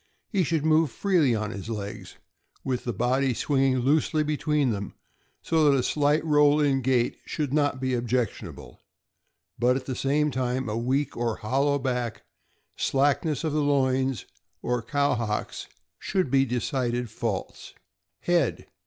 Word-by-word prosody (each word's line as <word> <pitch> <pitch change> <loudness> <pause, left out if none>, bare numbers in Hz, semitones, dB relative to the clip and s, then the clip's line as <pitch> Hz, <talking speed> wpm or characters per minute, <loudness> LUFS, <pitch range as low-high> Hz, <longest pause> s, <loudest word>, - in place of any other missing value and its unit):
He 195 -5 +1
should 160 -1 -1
move 160 -1 +4
freely 155 - +2
on 105 -1 -3
his 100 0 -7
legs, 105 -2 -6 0.5
with 130 -2 -2
the 120 - -1
body 125 +4 +1
swinging 135 0 +1
loosely 155 +3 +2
between 150 -3 0
them, 100 -2 -5 0.5
so 160 -2 +3
that 140 - +4
a 125 - 0
slight 150 +3 +1
roll 150 -1 +4
in 140 -3 +2
gait 125 -1 +1
should 145 -4 -3
not 145 -3 +1
be 130 0 -1
objectionable; 120 -2 -3 0.8
but, 125 +2 +3
at 130 -1 -4
the 130 - -3
same 150 +3 +1
time, 130 0 -1
a 105 - -2
weak 130 +5 -1
or 115 -2 -1
hol 130 +6 0
low 145 -1 +2
back, 125 -4 -3 0.5
slackness 145 +2 +1
of 155 -2 -1
the 150 - +1
loins, 130 -4 +1 0.4
or 125 -1 0
cow 140 +4 +1
hocks 110 -3 -3 0.3
should 185 -9 -1
be 135 0 +4
decided 125 0 -1
faults. 110 -4 -5 0.5
Head. 170 -7 +1
135 Hz, 155 wpm, -26 LUFS, 120-145 Hz, 0.8 s, move